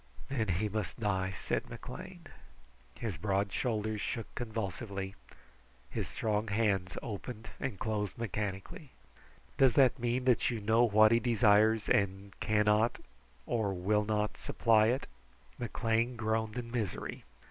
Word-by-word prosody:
"Then 120 -6 0
he 95 +4 0
must 105 +1 -4
die," 95 -3 0
said - - -2
McLean. 65 - -9 0.7
His 105 -8 -3
broad 100 +2 0
shoulders 110 -3 -1
shook 115 - -4
convulsively. 100 -3 -4 0.8
His - - -2
strong 110 0 -1
hands 100 -4 0
opened 110 +1 -6
and 130 -8 -3
closed 105 0 -2
mechanically. 105 - -4 0.7
"Does 130 -3 +5
that 135 -1 +5
mean 120 +2 0
that 125 -3 +3
you 120 -3 -2
know 110 +3 +3
what 110 0 +6
he 115 - +5
desires 110 -2 +4
and 100 0 +1
cannot, 105 +1 +3 0.5
or 105 -5 0
will 105 +4 +1
not, 105 0 -1
supply 110 -2 +3
it?" 125 +4 0 0.5
McLean 115 +1 0
groaned 110 0 -1
in 120 -1 -5
misery. 115 -6 -3
110 Hz, 130 wpm, -32 LUFS, 100-115 Hz, 0.8 s, what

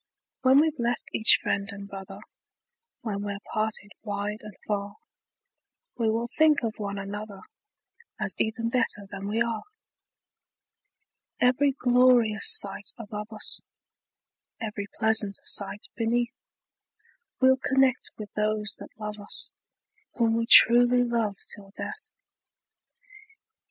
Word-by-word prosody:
When 260 +2 +5
we've 310 -2 0
left 235 0 -3
each 220 - +6
friend 200 +1 -2
and 200 0 -10
brother, 195 -1 -10 0.8
When 205 -4 -5
we're 200 -1 -5 0.2
parted 215 -1 -3
wide 205 0 -5
and 210 -2 -12
far, 200 -1 -4 1.0
We 230 -2 -1
will 230 +2 -2
think 310 -3 +4
of 220 -1 -4
one 200 -1 -5
another, 200 +1 -8 0.8
As - - +2
even 230 +1 -2
better 230 -4 -1
than 200 0 -7
we 225 +3 0
are. 230 -2 -4 1.8
Every 260 +3 +2
glorious 245 -4 +4
sight 200 0 +5
above 210 -1 -8
us, 215 -1 -2 1.0
Every 210 -3 -6
pleasant 220 -3 +3
sight 205 +1 +1
beneath, 235 +2 -1 1.1
We'll 260 0 +4
connect 265 -1 0
with 210 -1 -10
those 210 -1 -1
that - - -13
love 210 0 -7
us, 205 - -2 0.6
Whom 230 -2 +1
we 230 0 -2
truly 245 +1 +8
love 230 -4 -2 0.2
till 200 -1 -14
death! 425 0 -8
220 Hz, 120 wpm, -25 LUFS, 205-240 Hz, 1.8 s, truly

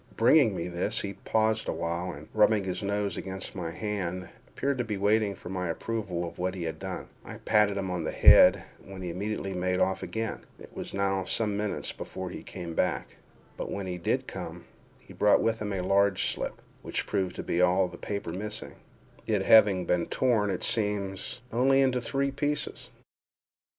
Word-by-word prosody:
Bringing - - +5
me 85 - -3
this, 90 +5 0
he 100 -1 -4
paused 110 +2 0
awhile, 85 +2 -2
and, 75 -1 -10
rubbing 105 -1 +4
his 90 -1 -3
nose 100 -2 -1
against 95 0 -5
my 85 -3 -4
hand, 90 -1 -3 0.2
appeared 140 -1 -2
to - - +2
be 105 -3 -3
waiting 105 0 +2
for 90 - -9
my 90 -1 -2
approval 90 -2 -3
of 85 - -10
what 90 +1 -1
he 90 - -4
had 80 -1 -4
done. - - -5 0.2
I - - -9
patted 105 -2 +2
him 95 -2 -2
on 90 -2 -2
the - - -2
head, - - +7 0.2
when 95 -1 -9
he 90 - -3
immediately 100 +1 -3
made 90 0 0
off 95 0 +1
again. 110 -1 -3 0.2
It - - -14
was - - -6
now 95 -1 0
some 105 -1 0
minutes 105 0 -2
before 95 -1 -6
he - - -7
came 85 -3 -7
back—but - - -4
when 100 - -4
he 90 -1 -4
did 85 - 0
come, - - -7 0.3
he - - -16
brought 105 - +4
with 115 0 +1
him 105 -1 -3
a 95 -2 -1
large 100 +1 +2
slip, - - -5 0.2
which - - -2
proved 95 -3 -1
to - - -5
be 85 - 0
all 90 +1 +4
the 85 -1 -11
paper 100 -5 -4
missing—it 105 +1 -4
having 100 -4 +6
been 85 0 +1
torn, 115 -5 +2
it 95 - -2
seems, 105 +1 0
only 135 +3 +3
into 130 -2 +2
three 135 +3 -1
pieces. 145 +1 -2
100 Hz, 185 wpm, -28 LUFS, 90-105 Hz, 0.3 s, head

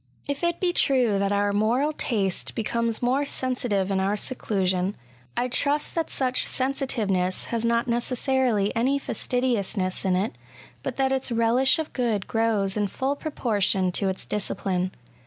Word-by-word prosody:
If 285 +3 -3
it 345 0 +1
be 355 -1 +1
true 250 - +3
that 200 0 +1
our 205 0 +2
moral 240 +9 +2
taste 200 -10 -1
becomes 230 +1 -1
more 260 +4 +2
sensitive 245 -8 -1
in 190 - +1
our 195 +2 +1
seclusion, 190 -5 -1 0.4
I 250 - +1
trust 285 +4 +1
that 330 -2 -1
such 255 -1 +1
sensitiveness 220 -9 0
has 230 -1 0
not 235 0 +1
necessarily 240 -3 +1
any 260 +5 +2
fastidiousness 230 -9 -1
in 190 -2 +2
it, 205 +8 0 0.5
but - - -4
that 265 -1 +1
its 265 -1 0
relish 235 +3 +3
of 315 -1 -4
good 225 -6 0
grows 220 -4 +1
in 210 -1 +1
full 265 +8 -1
proportion 205 - 0
to 195 +2 0
its 190 - -4
discipline. 185 -3 -1
230 Hz, 155 wpm, -25 LUFS, 200-260 Hz, 0.5 s, true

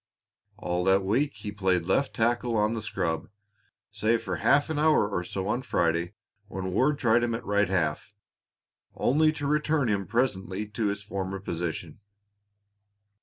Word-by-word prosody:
All 90 -3 -2
that 95 0 +4
week 130 +9 +1
he 105 +1 -6
played 95 -4 0
left 135 +9 +1
tackle 120 0 +1
on 105 +1 +2
the 115 - -3
scrub, 90 -6 -2 0.6
save 115 +1 +1
for 95 -5 -3
half 140 - +3
an 150 - -1
hour 155 -8 +4
or 95 -4 -2
so 95 +2 -4
on 115 +4 0
Friday 85 -8 0 0.3
when 95 0 -4
Ward 145 +6 +2
tried 120 -3 +3
him 115 -1 0
at 115 - -7
right 100 -1 +2
half, 90 +2 -1 0.8
only 155 +4 +3
to 150 -2 -5
return 150 -2 +1
him 100 -3 -1
presently 105 -3 -1
to 105 0 -1
his 100 0 -3
former 95 -1 -4
position. 85 -3 -4
105 Hz, 160 wpm, -27 LUFS, 95-120 Hz, 0.8 s, that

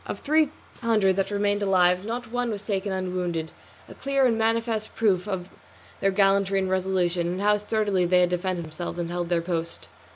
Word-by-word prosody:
Of - - -5
three 305 0 +3 0.3
hundred 215 -5 +2
that 195 - 0
remained 205 0 0
alive 185 0 +3
not 235 0 -4
one 245 0 -1
was 210 -2 -5
taken 200 -1 -2
unwounded, 180 -3 -2 0.4
a - - -11
clear 275 -1 +1
and 235 -3 +3
manifest 225 -1 -1
proof 200 -4 +1
of 190 -3 -4 0.5
their 195 - +2
gallantry 195 0 +2
and 190 -1 0
resolution, 185 -2 0
and 180 +2 -3
how 210 0 +3
sturdily 210 -3 0
they 180 0 +4
had 180 - +3
defended 180 -1 -2
themselves 165 +2 -6
and 170 -1 -3
held 175 -1 -3
their 170 -1 +1
post. 170 -1 -4
190 Hz, 190 wpm, -25 LUFS, 180-215 Hz, 0.5 s, they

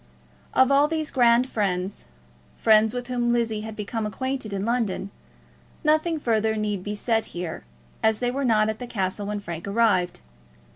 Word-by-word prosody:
Of 260 +1 +5
all 280 +2 +5
these 315 -1 -2
grand 240 0 +4
friends, 195 -5 -2 0.5
friends 220 0 +5
with 245 +1 -4
whom 240 -1 0
Lizzie 230 -3 0
had 220 0 -7
become 215 +1 -3
acquainted 260 +1 -3
in 200 0 -2
London, 225 -5 -1 0.7
nothing 310 +1 +2
further 220 -4 +1
need 210 -3 -2
be 205 +1 -3
said 225 +1 0
here, 170 - -5 0.4
as 220 -1 +3
they 245 +1 0
were 275 +2 -2
not 215 -4 +3
at 220 0 -3
the 245 - -6
castle 200 -2 -2
when 210 0 -2
Frank 170 -2 -6
arrived. 200 -4 +2
220 Hz, 165 wpm, -25 LUFS, 205-245 Hz, 0.7 s, Of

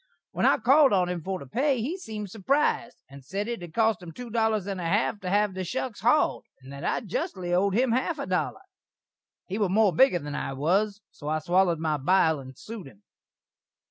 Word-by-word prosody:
When - - +1
I - - +5
called 275 0 +5
on 180 -2 +2
him 180 -2 -3
for 190 +3 -3
the 140 - -10
pay, 260 - 0
he 270 +11 -2
seemed 215 - -7
surprised, 240 +2 0
and 140 0 -13
sed 195 - -4
it 235 -5 -4
had 170 -2 -10
cost 225 -4 +2
him 175 -2 -9
two 240 +6 -9
dollars 220 -3 +1
and 195 -2 -4
a 170 - -2
half 205 +3 +1
to 185 - -5
hav 205 +1 +2
the 185 0 -4
shuks 245 +4 -4
hauld, 245 +7 +3 0.2
and 135 +1 -12
that 140 +3 -8
I - - 0
justly 190 - -3
owd 190 +2 +2
him 245 0 +2
a - - +3
half 325 +3 -3
a 280 - -4
dollar. - - -2 0.8
He 195 +3 -4
were 205 -3 +2
more 205 0 +3
bigger 265 -6 +5
than 145 -3 -6
I 140 - -3
was, 200 +9 0
so 145 - -10
I 155 +1 +1
swallered 175 +2 +2
my 155 -1 -1
bile 160 +1 +3
and 130 -1 -11
sued 215 -8 -8
him. 105 -6 -17
195 Hz, 225 wpm, -27 LUFS, 170-230 Hz, 0.8 s, I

